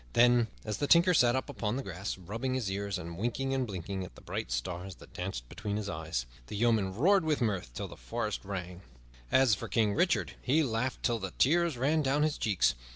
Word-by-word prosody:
Then, 120 -1 +5 0.2
as 105 -1 -3
the 145 - 0
Tinker 170 +3 +6
sat 120 -6 +5
up 130 - -1
upon 105 +1 -2
the 135 - -3
grass, 95 +1 -4
rubbing 115 +8 -3
his 115 -7 -1
ear 100 +1 -2
and 85 -1 -7
winking 130 +4 -1
and 130 -2 0
blinking 95 0 -4
at 85 -9 -10
the - - -14
bright - - -4
stars 90 +10 -3
that - - -16
danced 90 -10 -4
before 105 - -4
his 105 -1 -3
eyes, 80 -7 -3 0.2
the - - -6
yeomen 105 -4 +2
roared 185 - +4
with 155 -2 +1
mirth 100 - -1
till - - -3
the - - -10
forest - - -3
rang. 90 -2 -5 0.5
As 130 -4 +5
for 100 - -2
King 110 -3 +2
Richard, 175 - +1
he 150 +5 +3
laughed 125 0 -2
till 120 -2 +1
the 95 -2 -5
tears 170 0 +3
ran 150 +6 +2
down 145 +1 +2
his 155 -1 0
cheeks. 95 - +2
110 Hz, 220 wpm, -31 LUFS, 95-130 Hz, 0.5 s, Tinker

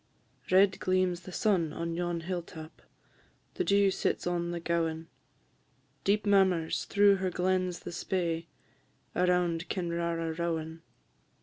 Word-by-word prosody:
"_ - - -7
Red 190 +1 +5
gleams 185 -1 +1
the 185 +1 -11
sun 180 -5 +1
on 170 0 -3
yon 175 0 -2
hill 175 +1 -3
tap, 160 -1 -11 0.7
The 370 - -1
dew 200 - +3
sits - - -1
on 175 -1 -1
the 175 0 -3
gowan; 165 -1 -1 0.9
Deep 205 +2 +1
murmurs 190 -5 +2
through 200 -1 +4
her 190 0 -1
glens 185 0 0
the - - -7
Spey, 170 -2 -2 0.7
Around 180 -1 +1
Kinrara 170 -2 -2
rowan. 165 -1 -3
175 Hz, 130 wpm, -30 LUFS, 165-185 Hz, 0.9 s, Red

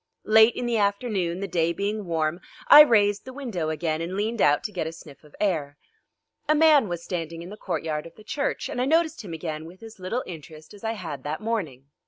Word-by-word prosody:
Late 220 +2 +6
in 245 - -3
the 235 -2 +1
afternoon, 200 -4 -1
the 200 - -2
day 170 -2 0
being 200 +2 -3
warm, 165 +1 -1 0.3
I 300 - +12
raised 205 -7 +4
the 260 - -9
window 225 - -3
again 160 0 -2
and 175 +3 -4
leaned 220 +2 -1
out 145 0 +4
to - - -4
get 175 -5 -3
a - - -4
sniff 155 -3 -14
of 150 - -18
air. 155 -8 -1 0.7
A 305 - +5
man 300 -6 +5
was 175 -1 -4
standing 165 -2 -5
in 180 - -10
the - - -7
courtyard 155 -6 -3
of 165 - -16
the 215 - -15
church, 280 +6 -2
and 250 - -3
I - - +2
noticed 320 +1 +1
him 180 -5 -7
again 155 -1 -5
with 180 +6 -13
as 225 -3 -12
little 205 +8 -3
interest 155 -1 -11
as 205 - -15
I 225 0 -1
had 170 -9 -6
that 150 +2 -3
morning. 180 - -3
185 Hz, 230 wpm, -25 LUFS, 160-225 Hz, 0.7 s, I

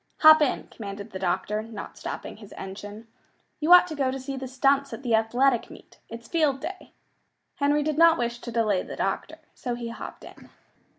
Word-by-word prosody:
"Hop 310 0 +9
in," 290 - 0
commanded 200 0 -8
the 190 - -6
doctor, 195 +3 -1
not 225 0 -8
stopping - - -6
his 210 -2 -13
engine. 205 +3 -8 0.5
"You 310 +3 +1
ought 360 0 +10
to 345 - -6
go 275 -3 +1
to 265 +1 -3
see 270 +1 -5
the 265 0 -5
stunts 275 +1 +1
at 230 - -7
the 240 -3 0
athletic 240 +3 +2
meet. - - -15
It's 230 0 -9
Field 300 -4 +1
Day." 370 +7 -7 0.7
Henry 290 +1 +2
did 305 0 -1
not 335 -1 +7
wish 240 0 -2
to 240 - -7
delay 215 -5 +1
the - - -8
doctor, 300 +10 -2 0.2
so 245 -2 -4
he 235 -1 -5
"hopped 230 - -8
in." - - -14
245 Hz, 195 wpm, -26 LUFS, 220-285 Hz, 0.7 s, ought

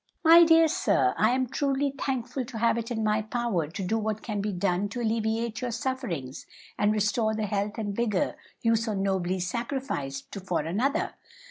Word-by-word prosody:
"My 335 +1 +9
dear 325 0 +6
sir, 135 - +2
I 215 - +3
am 255 +1 +1
truly 275 +2 0
thankful 265 -1 -2
to 235 -1 -8
have 230 +1 +3
it 230 - -5
in 225 -2 -2
my 215 0 +2
power 220 -7 -1
to 190 +6 -6
do 220 +5 0
what 215 0 -3
can 210 -3 -2
be 210 +1 -1
done 190 +1 0
to 225 - -5
alleviate 225 0 -1
your 250 - -2
sufferings 230 - -4 0.3
and 205 0 +2
restore 215 +1 +1
the 215 -1 -1
health 205 +1 -2
and 205 -3 -3
vigor 215 -5 0 0.3
you 230 -1 +4
so 225 -1 -1
nobly 190 -2 0
sacrificed 180 - -3
for 180 -4 0
another. 230 - -1
220 Hz, 185 wpm, -27 LUFS, 200-240 Hz, 0.3 s, My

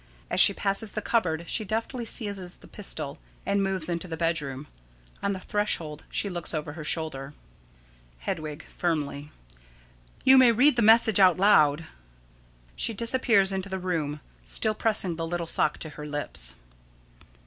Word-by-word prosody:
As - - +1
she - - +8
passes 200 +1 0
the 215 - -3
cupboard 170 -8 0
she 220 - 0
deftly 225 +4 -3
seizes 200 -5 -3
the - - -16
pistol, - - -6 0.3
and 200 0 +1
moves 190 -4 0
into 170 0 -3
the 165 -2 -5
bedroom. 150 -5 -2 0.6
On 200 - 0
the 190 - -5
threshold 175 -7 -2
she - - -1
looks 175 -3 -4
over 150 -1 -4
her 160 -1 -8
shoulder._] 150 -3 -3 0.9
Hedwig: 150 - -5
[Firmly.] 150 -4 -3 0.9
You 265 0 +7
may 250 -2 +7
read 250 +5 +5
the 240 - +1
message 220 -1 +5
out 185 -3 +6
loud. 165 -6 +4 0.9
[_She 225 - -2
disappears 230 -4 +3
into 190 0 -3
the 190 - -3
room, 160 -5 -3 0.2
still - - 0
pressing 205 -6 0
the 165 -1 -3
little 175 0 -3
sock - - +1
to 155 - -6
her 150 0 -9
lips. 105 - -3
180 Hz, 155 wpm, -27 LUFS, 155-210 Hz, 0.9 s, she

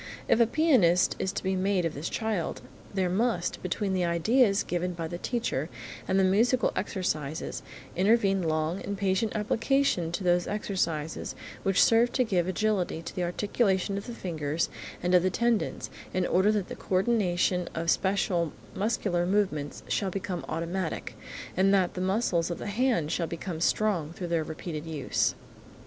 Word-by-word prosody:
If - - +4
a 235 - +5
pianist 230 - +4
is 190 - 0
to - - -4
be 190 0 0
made 190 -1 +1
of 165 - -1
this 145 +4 -4
child, 220 -7 -2 0.3
there 190 -2 0
must, 190 -1 0
between 190 +2 -1
the 185 -1 +1
ideas 195 +6 +3
given 180 +1 -2
by 165 -1 -3
the 175 +1 -6
teacher 180 - -2 0.4
and 190 +1 +2
the - - +4
musical 225 +7 +3
exercises, 160 -6 -2 0.3
intervene 195 0 +3
long 160 +2 -1
and 200 0 -4
patient 195 +2 0
application 220 -4 +1
to 180 - -2
those 175 -1 +2
exercises 170 -7 -2 0.3
which 195 -1 +4
serve 235 +1 +4
to 255 - +3
give 185 -6 0
agility 185 -4 0
to - - -8
the 185 - -2
articulation 195 +2 0
of 200 +3 -5
the 240 - -6
fingers 160 -5 -2 0.3
and 180 +1 +1
of 180 - +7
the 185 - +2
tendons, 235 +3 0 0.2
in 185 -1 +2
order 190 +5 +3
that 205 -4 -1
the - - -6
coordination 185 -3 +1
of 165 0 +1
special 185 -4 +1 0.2
muscular 190 -4 0
movements 185 -8 0
shall 195 - 0
become 185 -3 -4
automatic, 170 +2 -3 0.4
and 190 +2 +4
that 185 -2 +2
the 180 - -4
muscles 185 -3 +1
of 175 - -3
the - - -7
hand 210 - +1
shall 170 - 0
become 170 0 -5
strong 180 -5 +1
through 175 0 -6
their 165 -2 +1
repeated 160 0 -6
use. 155 -4 0
185 Hz, 165 wpm, -28 LUFS, 170-205 Hz, 0.4 s, of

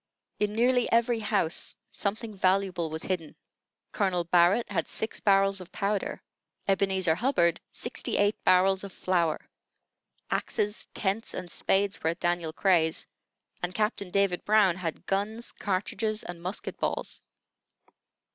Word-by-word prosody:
In 210 0 +1
nearly 245 +2 +2
every 235 0 +3
house 210 -6 0 0.2
something 215 +2 -2
valuable 185 -3 +1
was 160 +1 -4
hidden. 170 -5 -3 0.6
Colonel 185 -4 +1
Barrett 175 +6 +3
had 165 -5 -1
six 220 - -2
barrels 195 -1 +3
of 180 - -11
powder; 200 0 -2 0.4
Ebenezer 190 -3 +2
Hubbard, 170 - +2
sixty - - -2
eight 205 +1 +1
barrels 190 +1 +4
of 200 - -7
flour; 175 -4 0 0.9
axes, 210 0 -1
tents, 205 +3 -1
and 180 -2 -5
spades 195 +1 +1
were 160 - +1
at 170 +1 -3
Daniel 175 -2 0
Cray's; 165 -2 +2 0.6
and 180 +1 -3
Captain 210 -3 0
David 195 -1 +1
Brown 205 -4 +4
had 170 -3 -4
guns, 215 +4 -1
cartridges, 210 +2 -2
and 175 -1 -8
musket 185 +4 -5
balls. - - -2
195 Hz, 130 wpm, -28 LUFS, 175-210 Hz, 0.9 s, barrels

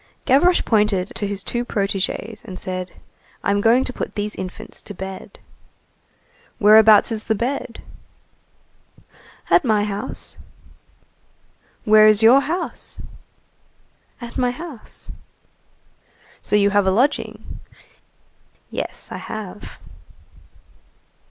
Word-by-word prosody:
Gavroche 320 +7 +4
pointed 210 -4 +1
to 205 - -3
his 200 -1 -4
two 240 0 -2
protégés, 205 0 -3
and 185 - -8
said:— 185 -1 -5 0.5
"I'm 200 +1 +1
going 235 +4 +4
to 255 - -4
put - - -5
these 210 0 -3
infants 185 -1 -7
to 205 - -10
bed." 190 +1 -8 1.2
"Whereabouts 215 +1 +6
is 220 -1 -4
the 220 - +1
bed?" 240 +1 -4 1.7
"At - - +5
my 215 -5 +2
house." 205 0 -5 1.5
"Where's 215 0 +6
your 240 +5 +8
house?" 340 +5 -5 1.2
"At 240 +1 -7
my 250 -1 +2
house." 275 -2 -8 1.3
"So - - 0
you 200 -1 +4
have 205 -1 +2
a - - +4
lodging?" 250 +9 -1 1.1
"Yes, - - -5
I - - -5
have." 210 -2 -8
215 Hz, 105 wpm, -21 LUFS, 200-240 Hz, 1.7 s, your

